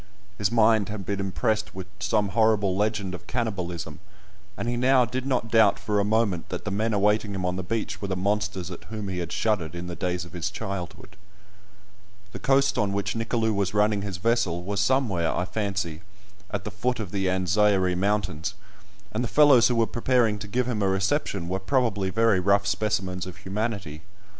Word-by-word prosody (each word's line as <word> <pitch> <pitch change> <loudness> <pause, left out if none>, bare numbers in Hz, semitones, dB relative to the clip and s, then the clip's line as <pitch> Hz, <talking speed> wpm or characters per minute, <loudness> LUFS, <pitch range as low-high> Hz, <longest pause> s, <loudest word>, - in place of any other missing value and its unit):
His 105 0 +1
mind 110 -3 +4
had 105 -2 -5
been 100 -1 -2
impressed 105 +2 -1
with 95 -1 -6
some 100 +1 +1
horrible 105 -2 +2
legend 105 -2 -1
of 90 - -8
cannibalism, 90 - -3 0.6
and - - -3
he 120 - 0
now 125 +1 +4
did 130 +3 -4
not 120 -4 -1
doubt 110 -3 +5
for 105 -1 -1
a - - +3
moment 105 -5 0
that 90 - -5
the 105 - -2
men 110 +3 0
awaiting 105 0 +1
him 95 -1 -2
on 90 0 -1
the 95 - -2
beach 110 +4 -3
were 100 - -3
the 95 - -2
monsters 95 -2 -1
at 90 - -9
whom 105 -3 -5
he 90 -1 -3
had 85 -1 -4
shuddered 90 -8 0
in 85 0 -5
the 90 -1 -5
days 90 -1 -2
of 85 - -14
his 90 +3 -2
childhood. 95 -2 -6 1.1
The - - -7
coast 135 0 +2
on 100 -2 +1
which 100 0 -1
Nicolou 115 0 0
was 100 0 -1
running 105 0 +3
his 100 -3 -4
vessel 90 -5 +1
was 100 +2 -1
somewhere, 105 -8 +1
I 90 - 0
fancy, 95 -6 -3 0.5
at 100 -2 -3
the - - -5
foot 125 +4 -1
of 100 -5 -5
the 95 -2 -1
Anzairie 95 0 +2
Mountains, 95 -2 -1 0.6
and 115 +3 -1
the - - -1
fellows 140 -3 +6
who 125 - 0
were 115 -1 +3
preparing 120 -3 +1
to 105 - -7
give 125 +4 0
him 115 -4 -1
a 100 - +2
reception 95 - 0
were 95 +2 -1
probably 105 -3 0
very 115 -1 +3
rough 100 +2 +3
specimens 95 -3 -1
of 90 - -9
humanity. 100 -6 -4
100 Hz, 195 wpm, -26 LUFS, 95-110 Hz, 1.1 s, fellows